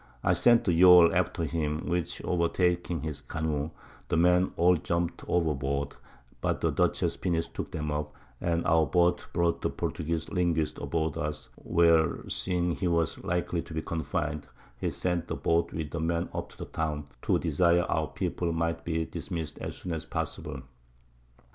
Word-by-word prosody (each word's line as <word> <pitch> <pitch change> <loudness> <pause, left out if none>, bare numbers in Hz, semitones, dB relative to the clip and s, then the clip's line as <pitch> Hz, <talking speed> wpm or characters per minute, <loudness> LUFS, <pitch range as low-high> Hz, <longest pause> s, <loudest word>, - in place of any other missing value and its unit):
I - - +4
sent 120 -1 +5
the 90 - +2
Yawl 90 0 +8
after 85 - 0
him, 80 -1 -2
which 85 -2 -2
overtaking 90 0 +1
his 80 -2 -4
Canoe, 75 -1 -2 0.4
the 85 - 0
Men 90 +2 +4
all 90 +2 +5
jumpt 85 +1 -2
over 85 -3 +2
board, 70 +1 -2 0.5
but - - 0
the - - +1
Dutchess's - - +1
Pinnace 85 -2 0
took - - -6
'em 75 -1 -2
up, 75 0 -2 0.3
and 85 0 0
our 80 -1 +4
Boat 90 0 +2
brought 85 -1 +1
the - - 0
Portugueze 85 -1 -3
Linguist 85 -4 0
aboard 80 -3 -1
us, 75 0 -4
where 85 -2 +2
seeing 90 -1 0
he 90 - -1
was 85 -2 0
likely 90 -1 -1
to 80 - -9
be 80 - -2
confin'd, 75 -2 -3 0.3
he - - -2
sent 90 -2 -2
the - - -3
Boat 85 0 +1
with 80 -3 -4
the 85 - -3
Men 85 +2 -1
up - - -4
to - - -17
the - - -6
Town, 75 -2 -3 0.2
to - - +2
desire 85 +3 +3
our 80 -2 0
People 85 -1 -2
might 85 0 -1
be 80 -1 -1
dismiss'd 80 -3 -5
as - - -5
soon 90 - -6
as 80 - -4
possible. 70 -3 -4
85 Hz, 175 wpm, -29 LUFS, 80-85 Hz, 0.5 s, Yawl